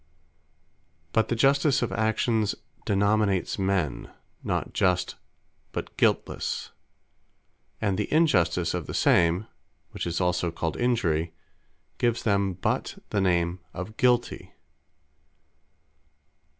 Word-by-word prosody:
But 110 Hz, -, +3 dB
the 120 Hz, -, 0 dB
Justice 135 Hz, +2 st, +3 dB
of 115 Hz, -, -2 dB
Actions 110 Hz, +1 st, +1 dB, 0.3 s
denominates 100 Hz, -1 st, +1 dB
men, 95 Hz, -8 st, -1 dB, 0.3 s
not -, -, -2 dB
Just, 90 Hz, -1 st, +1 dB, 0.6 s
but -, -, -5 dB
Guiltlesse; -, -, 0 dB, 1.1 s
and 100 Hz, -3 st, 0 dB
the 105 Hz, -, -2 dB
Injustice 90 Hz, -, +3 dB
of 90 Hz, -4 st, -3 dB
the -, -, -5 dB
same, 85 Hz, +4 st, +3 dB, 0.5 s
(which -, -, -4 dB
is 85 Hz, -1 st, -2 dB
also 90 Hz, -1 st, +1 dB
called 80 Hz, 0 st, -3 dB
Injury,) 85 Hz, -10 st, 0 dB, 0.6 s
gives 120 Hz, -1 st, +1 dB
them 100 Hz, -3 st, +1 dB
but 90 Hz, -, -2 dB
the 100 Hz, -, +1 dB
name 85 Hz, -1 st, +1 dB, 0.2 s
of 95 Hz, +5 st, -6 dB
Guilty. 125 Hz, -3 st, +1 dB
100 Hz, 105 wpm, -26 LUFS, 90-110 Hz, 1.1 s, But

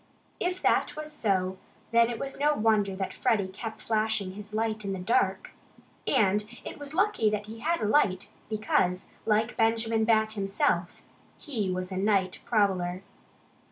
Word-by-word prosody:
If 360 Hz, +1 st, -2 dB
that -, -, +2 dB
was 305 Hz, 0 st, -6 dB
so, 190 Hz, -8 st, 0 dB, 0.3 s
then 230 Hz, 0 st, +5 dB
it 235 Hz, -, -3 dB
was 275 Hz, +2 st, -5 dB
no 295 Hz, +1 st, +3 dB
wonder 210 Hz, -4 st, +2 dB
that 190 Hz, 0 st, -3 dB
Freddie 205 Hz, -4 st, +1 dB
kept 220 Hz, +3 st, -7 dB
flashing 215 Hz, -3 st, 0 dB
his 205 Hz, +2 st, -9 dB
light 220 Hz, 0 st, -1 dB
in 195 Hz, -1 st, -2 dB
the -, -, -3 dB
dark. 190 Hz, +1 st, 0 dB, 0.5 s
And 210 Hz, 0 st, +3 dB, 0.2 s
it -, -, -7 dB
was 290 Hz, +1 st, -6 dB
lucky 380 Hz, -, +3 dB
that 210 Hz, -1 st, -2 dB
he 220 Hz, +1 st, -9 dB
had 335 Hz, +6 st, 0 dB
a -, -, +1 dB
light, 205 Hz, -6 st, +2 dB, 0.2 s
because 190 Hz, -4 st, +1 dB, 0.2 s
like 220 Hz, +2 st, +2 dB
Benjamin 225 Hz, 0 st, +2 dB
Bat 220 Hz, -1 st, +3 dB
himself 195 Hz, -3 st, 0 dB, 0.3 s
he 225 Hz, -, -3 dB
was 185 Hz, 0 st, -3 dB
a 185 Hz, -, -3 dB
night 195 Hz, -2 st, +1 dB
prowler. 190 Hz, -4 st, +1 dB
215 Hz, 160 wpm, -28 LUFS, 190-225 Hz, 0.5 s, then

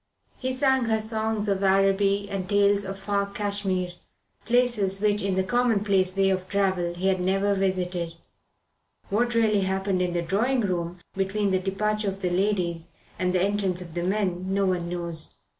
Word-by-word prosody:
He 260 Hz, 0 st, -2 dB
sang 265 Hz, -1 st, +2 dB
her 220 Hz, -1 st, +1 dB
songs 220 Hz, -1 st, -1 dB
of 195 Hz, -1 st, 0 dB
Araby 195 Hz, +1 st, +3 dB
and 195 Hz, -2 st, -4 dB
tales 200 Hz, 0 st, +3 dB
of 195 Hz, 0 st, -5 dB
far 200 Hz, 0 st, -1 dB
Cashmere 200 Hz, -3 st, -2 dB, 0.5 s
places 235 Hz, -5 st, +2 dB
which 210 Hz, 0 st, +2 dB
in 195 Hz, -1 st, 0 dB
the 190 Hz, -, +2 dB
commonplace 200 Hz, -4 st, +1 dB
way 195 Hz, 0 st, +3 dB
of 185 Hz, 0 st, -2 dB
travel 190 Hz, -3 st, 0 dB
he 180 Hz, +2 st, -4 dB
had 190 Hz, -1 st, +2 dB
never 195 Hz, +2 st, +1 dB
visited. 180 Hz, -3 st, -1 dB, 1.0 s
What 235 Hz, +3 st, +1 dB
really 215 Hz, -3 st, +3 dB
happened 190 Hz, 0 st, 0 dB
in 180 Hz, -1 st, 0 dB
the 175 Hz, -1 st, 0 dB
drawing 235 Hz, +9 st, +1 dB
room 175 Hz, -3 st, -2 dB, 0.2 s
between 195 Hz, +1 st, 0 dB
the 185 Hz, -, +2 dB
departure 210 Hz, +2 st, -1 dB
of 195 Hz, 0 st, -7 dB
the 180 Hz, -, 0 dB
ladies 175 Hz, -3 st, -1 dB, 0.3 s
and 180 Hz, 0 st, +1 dB
the 180 Hz, 0 st, +2 dB
entrance 195 Hz, -2 st, 0 dB
of 175 Hz, -3 st, -9 dB
the 175 Hz, -, -2 dB
men 185 Hz, -1 st, -1 dB
no 195 Hz, 0 st, +2 dB
one 180 Hz, -2 st, -1 dB
knows. 170 Hz, -2 st, -5 dB
195 Hz, 175 wpm, -26 LUFS, 185-205 Hz, 1.0 s, Araby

